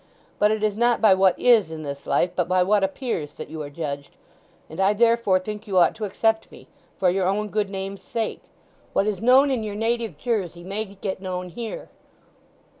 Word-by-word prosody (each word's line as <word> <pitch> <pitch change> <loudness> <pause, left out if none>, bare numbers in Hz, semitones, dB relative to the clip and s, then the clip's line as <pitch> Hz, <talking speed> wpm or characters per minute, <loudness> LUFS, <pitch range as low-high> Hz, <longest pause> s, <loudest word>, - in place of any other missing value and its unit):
"But 210 - +4
it 215 0 -1
is 210 -2 +1
not 240 +1 +2
by 215 -3 +6
what 190 -1 +3
is, 230 -8 +4
in 160 -1 -7
this 140 -1 -7
life, 175 - +2
but 180 -2 0
by 185 0 +3
what 200 +1 +2
appears, 195 - -3
that - - -8
you 160 -1 -5
are 145 - -6
judged; 140 -2 -6 0.5
and 160 - -10
I 195 +2 +4
therefore 230 -3 +3
think 210 +3 -6
you 190 -2 -1
ought 175 - +5
to 215 - -4
accept 220 +2 0
me—for 180 -2 -4
your 185 0 0
own 210 +2 0
good 210 -1 -1
name's 195 0 -5
sake. 225 -2 -3 0.5
What 195 - +2
is 210 -1 -2
known 260 +4 +5
in 255 -4 0
your 210 -2 -4
native 230 +1 -1
Jersey 190 -8 -2
may 200 +4 -3
get 195 -1 -6
known 180 -1 -4
here." 230 +5 -7
200 Hz, 200 wpm, -24 LUFS, 185-220 Hz, 0.5 s, by